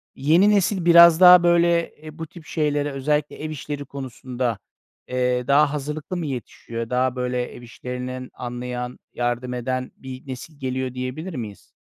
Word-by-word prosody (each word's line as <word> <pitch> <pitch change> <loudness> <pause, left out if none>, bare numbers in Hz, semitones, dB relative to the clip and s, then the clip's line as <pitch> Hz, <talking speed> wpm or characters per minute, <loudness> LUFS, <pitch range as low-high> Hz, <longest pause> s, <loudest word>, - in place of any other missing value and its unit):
Yeni 165 +9 +4
nesil 195 -3 +2
biraz 170 -1 +8
daha 180 -1 +9
böyle, 170 -1 +3
eee, 155 0 -12
bu 160 - -5
tip 170 0 -14
şeylere 145 -2 -1
özellikle 150 +2 -1
ev 155 - -3
işleri 145 -1 -5
konusunda, 125 -4 -4 0.5
eee, 125 -1 0
daha 145 +1 +4
hazırlıklı 150 +4 -4
mı 170 - -3
yetişiyor? 115 -3 -6
Daha 125 0 +1
böyle 125 0 -1
ev - - -11
işlerinin 125 +1 -6
anlayan, 125 0 -5
yardım 120 +1 -2
eden 130 +1 -3
bir 130 0 -10
nesil 135 +3 -8
geliyor 130 -1 -3
diyebilir 130 +8 -5
miyiz? 110 -6 -7
130 Hz, 155 wpm, -23 LUFS, 125-155 Hz, 0.5 s, daha